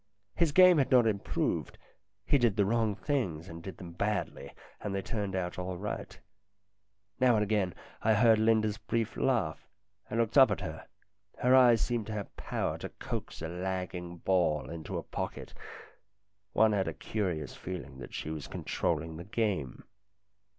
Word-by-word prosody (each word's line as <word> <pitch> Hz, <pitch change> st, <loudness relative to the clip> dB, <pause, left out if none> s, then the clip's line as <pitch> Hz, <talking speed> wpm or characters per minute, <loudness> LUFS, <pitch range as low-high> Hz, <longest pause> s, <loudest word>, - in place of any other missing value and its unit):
His 165 Hz, +4 st, +2 dB
game 180 Hz, 0 st, +7 dB
had 135 Hz, -, +2 dB
not 125 Hz, -3 st, +6 dB
improved; 105 Hz, -3 st, -1 dB, 0.5 s
he 145 Hz, -, +3 dB
did 120 Hz, -5 st, +3 dB
the 100 Hz, -2 st, +3 dB
wrong 110 Hz, 0 st, +1 dB
things 95 Hz, -, -2 dB
and 85 Hz, -1 st, -8 dB
did 95 Hz, +2 st, -8 dB
them 85 Hz, -2 st, -9 dB
badly, 85 Hz, -7 st, -2 dB, 0.3 s
and 100 Hz, -2 st, -3 dB
they 100 Hz, -, -1 dB
turned 100 Hz, -4 st, -3 dB
out 90 Hz, -1 st, -2 dB
all 90 Hz, 0 st, -3 dB
right. 105 Hz, +3 st, -5 dB, 1.0 s
Now 125 Hz, -2 st, +5 dB
and 105 Hz, -, +3 dB
again 100 Hz, -5 st, 0 dB, 0.3 s
I 110 Hz, 0 st, +3 dB
heard 110 Hz, 0 st, +5 dB
Linda's 110 Hz, -1 st, +2 dB
brief 115 Hz, 0 st, -2 dB
laugh, 100 Hz, -9 st, 0 dB, 0.4 s
and 115 Hz, -, -1 dB
looked 115 Hz, +5 st, +4 dB
up 135 Hz, -, +8 dB
at -, -, -1 dB
her. -, -, -6 dB, 0.5 s
Her 125 Hz, +1 st, +4 dB
eyes 120 Hz, -3 st, +6 dB
seemed 120 Hz, -3 st, -1 dB
to 110 Hz, -, -4 dB
have 105 Hz, -2 st, -5 dB
power -, -, -2 dB
to -, -, -5 dB
coax -, -, -6 dB
a -, -, -2 dB
lagging 90 Hz, 0 st, -4 dB
ball 85 Hz, -5 st, +1 dB
into 80 Hz, -2 st, -5 dB
a -, -, -4 dB
pocket; -, -, -5 dB, 1.0 s
one 110 Hz, +1 st, +4 dB
had 100 Hz, -2 st, +1 dB
a -, -, -3 dB
curious 90 Hz, -9 st, -3 dB
feeling 90 Hz, -7 st, -7 dB
that -, -, -8 dB
she 80 Hz, -, -4 dB
was 75 Hz, -2 st, -5 dB
controlling 80 Hz, -1 st, -2 dB
the 85 Hz, -, -7 dB
game. 100 Hz, -, -2 dB
105 Hz, 170 wpm, -31 LUFS, 90-115 Hz, 1.0 s, up